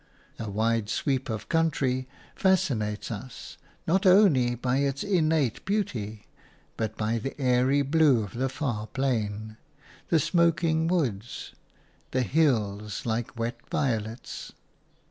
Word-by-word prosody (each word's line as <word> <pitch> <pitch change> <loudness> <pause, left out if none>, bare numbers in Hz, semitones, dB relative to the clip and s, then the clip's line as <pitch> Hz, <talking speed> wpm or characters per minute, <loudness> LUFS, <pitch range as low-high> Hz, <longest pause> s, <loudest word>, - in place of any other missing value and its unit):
A 110 - -4
wide 110 +1 0
sweep 135 -3 -1
of 110 -1 -4
country 140 -6 +1 0.3
fascinates 130 - +1
us 115 +4 -8 0.3
not 185 +4 +2
only 160 -11 +5
by 125 +2 0
its 140 -1 0
innate 160 - +1
beauty 115 - -2 0.5
but 110 -1 -3
by 110 +2 0
the 135 +6 -6
airy 130 +2 +3
blue 140 -5 +4
of 100 - -8
the 130 +3 -1
far 125 -6 -3
plain, 110 -5 -2 0.5
the 165 - +4
smoking 165 0 +2
woods, 120 - -2 0.6
the 130 0 0
hills 110 -6 0
like 115 +2 -2
wet 115 +1 -2
violets. 115 -3 -3
130 Hz, 120 wpm, -27 LUFS, 110-155 Hz, 0.6 s, only